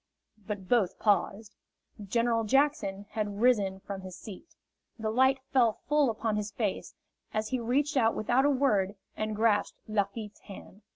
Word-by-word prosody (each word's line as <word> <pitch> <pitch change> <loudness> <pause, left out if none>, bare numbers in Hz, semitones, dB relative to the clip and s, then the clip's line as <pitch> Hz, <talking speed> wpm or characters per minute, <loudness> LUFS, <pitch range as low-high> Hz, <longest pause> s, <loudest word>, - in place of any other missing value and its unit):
But 205 -3 -5
both 215 -6 +2
paused. 205 +1 0 0.5
General 230 +3 +1
Jackson 270 -5 +1
had 205 -2 -3
risen 205 -6 +2
from 195 -1 -6
his 185 -1 -9
seat. 210 - -11 0.4
The 220 -1 -2
light 265 +3 +4 0.2
fell 240 -4 +4
full 295 -1 +3
upon 220 -1 -1
his 210 0 -2
face 210 -1 -3 0.4
as 215 0 -1
he 255 - -1
reached 275 +6 0
out 230 -4 +3
without 245 +5 +2
a 290 - +4
word 215 -8 +2 0.2
and 215 0 -2
grasped 215 -1 +1
Lafitte's 210 0 -2
hand. 200 +1 -12
220 Hz, 155 wpm, -29 LUFS, 205-245 Hz, 0.5 s, light